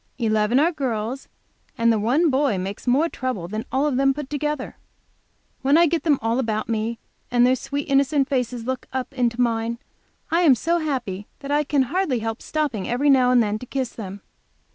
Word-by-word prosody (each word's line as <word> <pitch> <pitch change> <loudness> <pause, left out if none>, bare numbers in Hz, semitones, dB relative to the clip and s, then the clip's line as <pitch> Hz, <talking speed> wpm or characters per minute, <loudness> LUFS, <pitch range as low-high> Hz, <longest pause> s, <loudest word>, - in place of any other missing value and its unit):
Eleven 220 +1 +2
are 325 +4 +3
girls, 255 -4 -3 0.5
and 230 0 +3
the 220 - 0
one 275 +10 +2
boy 265 -6 +2
makes 195 +6 -5
me 245 - +4
more 305 +6 +3
trouble 255 - -4
than 215 +4 -4
all 270 +2 +1
of 285 -4 0
them 270 0 +3
put 295 -2 -6
together. 295 -1 -3 0.9
When 280 +3 +4
I 340 - +6
get 335 0 0
them 300 -4 +2
all 230 +2 +1
about 220 -4 -1
me, 225 0 -2 0.3
and 245 0 +4
their 255 +1 +4
sweet 280 +3 -4
innocent 275 0 +2
faces 250 -3 -2
look 260 0 -3
up 260 +1 -4
into 245 -2 0
mine, 230 -1 0 0.5
I 335 +2 +3
am 300 -7 +6
so 335 +9 0
happy 240 - -3
that 280 0 -5
I 295 +1 +3
can 285 -2 +2
hardly 300 -1 0
help 225 0 -4
stopping 285 -11 -2
every 280 +4 +3
now 255 -2 +4
and 250 -2 +5
then 210 0 -2
to 250 - -8
kiss 260 -2 -2
them. 200 -2 -8
255 Hz, 205 wpm, -23 LUFS, 225-285 Hz, 0.9 s, I